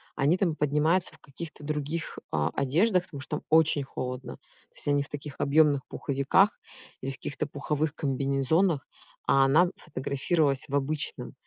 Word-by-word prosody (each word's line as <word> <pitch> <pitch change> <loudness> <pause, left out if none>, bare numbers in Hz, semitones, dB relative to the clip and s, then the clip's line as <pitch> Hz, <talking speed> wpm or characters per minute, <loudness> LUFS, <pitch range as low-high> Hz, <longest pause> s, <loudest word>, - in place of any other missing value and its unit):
они 150 +7 +3
там 170 -5 +1
поднимаются 150 +5 +1
в - - -18
каких-то 150 +2 -9
других, 150 +2 -3
а, 75 -2 +1
одеждах, 175 - +2
потому 145 - -9
что 145 +3 -3
там - - -10
очень 155 -2 +4
холодно. 125 -1 -5 0.4
То - - -40
есть - - -11
они 145 0 +3
в - - -14
таких 145 -1 -7
объёмных 145 -1 +3
пуховиках, 140 +9 +2 0.4
или 135 +1 -3
в - - -7
каких-то 145 +3 -4
пуховых 150 +1 -2
комбинезонах, 140 +4 +1 0.4
а 135 0 +5
она 160 +7 +5
фотографировалась 140 +1 0
в 140 - -2
обычном. 145 +2 -2
145 Hz, 155 wpm, -28 LUFS, 135-160 Hz, 0.4 s, а